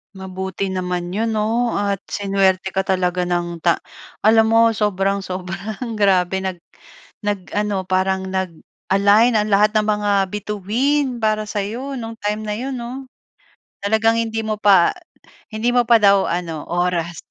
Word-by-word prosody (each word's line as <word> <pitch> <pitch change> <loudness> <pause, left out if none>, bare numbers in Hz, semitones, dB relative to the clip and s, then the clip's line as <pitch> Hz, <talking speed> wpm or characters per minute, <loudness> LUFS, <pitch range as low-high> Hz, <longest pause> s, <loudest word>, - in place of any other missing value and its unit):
Mabuti 190 0 -4
naman 180 -1 -3
'yon, 220 +3 -1
'no, 230 +3 0
at 200 -1 0
sinuwerte 195 -1 0
ka 190 0 -1
talaga 180 -1 0
ng 175 -1 -2
ta 170 +1 +1 0.4
alam 220 +1 +5
mo 230 0 +5
sobrang 200 -2 0
sobrang 195 +5 -5
grabe 190 -2 +3
nag 190 -1 -3 0.7
nag 205 -3 -3
ano 205 -2 -1
parang 190 +1 0
nag-align 195 +4 +1
ang 210 0 +1
lahat 210 +2 +3
ng 215 - +3
mga 210 -1 +1 0.2
bituin 235 +7 -1
para 215 -1 +1
sa'yo 225 +7 -4
no'ng 225 -1 -6
time 210 +1 -1
na 210 - -2
'yon, 260 +4 -4
'no? 245 +3 -6 0.8
Talagang 220 +3 +2
hindi 225 -1 -2
mo 215 -1 -2
pa, 195 -5 +5 0.6
hindi 225 +3 0
mo 245 0 +3
pa 235 - +7
daw 200 -1 +5
ano 165 -3 -3
oras. 175 -1 -1
200 Hz, 145 wpm, -20 LUFS, 185-220 Hz, 0.8 s, pa